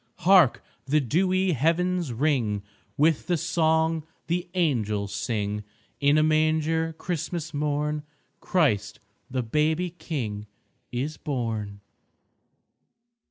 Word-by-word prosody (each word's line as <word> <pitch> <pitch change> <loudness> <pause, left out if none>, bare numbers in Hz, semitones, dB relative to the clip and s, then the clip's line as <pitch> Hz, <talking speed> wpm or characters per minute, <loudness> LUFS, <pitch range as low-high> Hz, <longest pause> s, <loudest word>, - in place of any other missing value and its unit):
Hark! 180 -8 +6 0.2
the 150 +3 +3
dewy 185 - +2
Heavens 170 +2 +1
ring 115 -6 0 0.3
With 155 +1 +2
the 175 - +2
song 160 0 +1 0.2
the 175 +1 -2
Angels 110 - 0
sing, 105 -3 -2 0.4
"In 145 +1 +4
a 155 - +4
manger 155 +1 +2
Christmas 165 -1 -3
morn 150 +1 -1 0.4
Christ 140 - +1 0.3
the 130 -1 -1
baby 155 +8 +1
King 120 -12 -4 0.4
is 140 +5 -3
born!" 110 -8 -3
150 Hz, 100 wpm, -26 LUFS, 120-165 Hz, 0.4 s, Hark